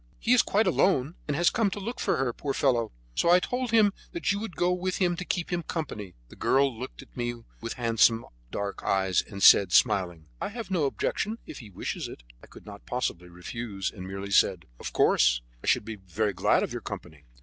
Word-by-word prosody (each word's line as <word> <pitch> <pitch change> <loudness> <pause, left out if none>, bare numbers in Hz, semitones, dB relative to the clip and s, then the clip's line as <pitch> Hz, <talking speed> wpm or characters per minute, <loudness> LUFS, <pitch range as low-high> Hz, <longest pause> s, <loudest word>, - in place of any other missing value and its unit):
He 240 - +2
is 250 - +7
quite 215 +2 +1
alone, 155 -5 +2
and 145 -1 -1
has 175 +1 +4
come 225 -3 +2
to 200 - -5
look 230 +5 -5
for - - +1
her, 130 -2 0
poor 140 +2 -3
fellow; 120 -5 +1 0.2
so 170 - +1
I 175 +1 +7
told 250 +5 -2
him 220 -3 +4 0.2
that 340 - 0
you 200 - -1
would 215 -5 -6
go 175 +1 +2
with 180 0 -2
him 175 -2 +2
to 180 - -4
keep 180 -1 -2
him 175 - 0
company." 115 - -5
The - - -13
girl 135 -2 +2
looked 125 +4 -8
at - - -23
me 120 -1 -2 0.3
with 115 0 -4
her 125 - -9
handsome 115 0 +4 0.2
dark 100 -1 -4
eyes, 95 -2 +2
and 100 -2 -7
said, 95 -3 +8
smiling: 90 -7 +2 0.2
"I - - -2
have 225 -1 -7
no 170 -6 +2
objection, 210 +10 -1
if - - -9
he 110 - -11
wishes 95 - -4
it" - - -11 0.2
I - - -13
could - - -15
not 100 -1 -11
possibly 90 -8 -3
refuse, 95 +3 -5
and 95 -3 -9
merely 95 +1 -6
said: - - +3
"Of - - -5
course, - - +3 0.2
I - - -7
shall - - +3
be 110 0 -7
very 100 +3 -2
glad 95 - +2
of - - -3
your - - -4
company." 70 -3 -8
120 Hz, 225 wpm, -27 LUFS, -, 0.3 s, said